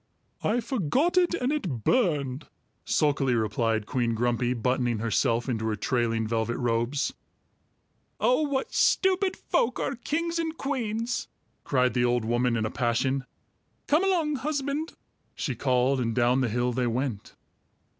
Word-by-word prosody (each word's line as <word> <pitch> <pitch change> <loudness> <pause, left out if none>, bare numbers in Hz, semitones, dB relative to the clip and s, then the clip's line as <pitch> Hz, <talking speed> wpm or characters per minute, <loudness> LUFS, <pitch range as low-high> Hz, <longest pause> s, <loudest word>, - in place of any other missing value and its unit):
"I 240 +3 +1
forgot 260 - 0
it, 355 -1 +3
and 255 -4 -1
it 175 - -2
burned," 150 - +1 0.4
sulkily 140 -4 +2
replied 110 0 0
Queen 120 0 0
Grumpy, 120 +1 0
buttoning 125 0 0
herself 115 +1 +1
into 110 -3 -1
her 110 - 0
trailing 115 0 0
velvet 115 +1 -1
robes. 120 +4 0 1.1
"Oh, 255 +4 +3
what 280 -3 -1
stupid 380 0 +2
folk 240 +1 0
are - - -1
kings 335 +7 -2
and 320 -1 -2
queens!" 235 -3 -2 0.4
cried 125 -2 +2
the 125 - +1
old 120 -2 +1
woman 120 +1 +1
in 110 - 0
a 110 - -3
passion. 130 +2 0 0.6
"Come 305 +5 +3
along, 335 -7 +1
husband," 290 +2 -2 0.4
she 135 - -2
called, 130 +2 +1
and 115 -2 -1
down 125 +1 +3
the 125 - +1
hill 120 +2 0
they 125 0 0
went. 120 -3 -3
130 Hz, 145 wpm, -27 LUFS, -, 1.1 s, it